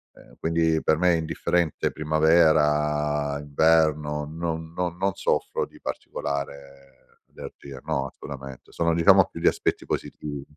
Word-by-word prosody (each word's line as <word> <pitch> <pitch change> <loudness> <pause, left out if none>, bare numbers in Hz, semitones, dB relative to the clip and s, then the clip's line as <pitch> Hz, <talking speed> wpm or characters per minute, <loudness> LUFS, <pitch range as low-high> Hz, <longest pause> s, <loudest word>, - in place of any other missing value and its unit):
ehm, - - -18
quindi 80 -1 +1
per 80 - +2
me 90 +1 +3
è - - +2
indifferente 80 0 -1
primavera, 75 -2 +2
inverno, 75 0 +2
non 80 0 -4
no 90 0 -1
non 95 +3 -1
soffro - - -1
di - - -18
particolare 70 -1 -6 0.4
allergia, 70 -2 -10
no, 70 0 -1
assolutamente, 65 -1 -10
sono 85 0 0
diciamo 95 +3 +6
più 85 - -8
gli 85 - +1
aspetti - - 0
positivi. 75 -2 -5
75 Hz, 130 wpm, -25 LUFS, 70-80 Hz, 0.4 s, diciamo